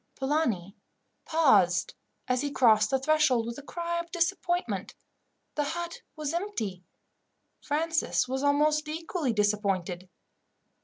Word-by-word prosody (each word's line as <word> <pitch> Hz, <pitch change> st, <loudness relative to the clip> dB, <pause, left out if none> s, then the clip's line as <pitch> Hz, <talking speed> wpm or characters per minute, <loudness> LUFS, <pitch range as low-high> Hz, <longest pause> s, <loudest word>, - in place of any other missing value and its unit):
Polani 245 Hz, -, -1 dB, 0.5 s
paused 200 Hz, -, +3 dB, 0.3 s
as 255 Hz, 0 st, +1 dB
he 290 Hz, -, -1 dB
crossed 220 Hz, -6 st, +4 dB
the 265 Hz, -, +2 dB
threshold, 270 Hz, -4 st, +2 dB
with 235 Hz, +3 st, -5 dB
a -, -, -8 dB
cry 340 Hz, +3 st, -3 dB
of 340 Hz, 0 st, -6 dB
disappointment 350 Hz, 0 st, -1 dB, 0.6 s
the 295 Hz, -, 0 dB
hut 340 Hz, +3 st, -4 dB
was 305 Hz, 0 st, -3 dB
empty. 230 Hz, -, -3 dB, 0.8 s
Francis 315 Hz, -3 st, 0 dB
was 265 Hz, +1 st, -2 dB
almost 300 Hz, +2 st, +2 dB
equally 320 Hz, -2 st, -2 dB
disappointed. 200 Hz, -4 st, 0 dB
285 Hz, 115 wpm, -28 LUFS, 215-325 Hz, 0.8 s, crossed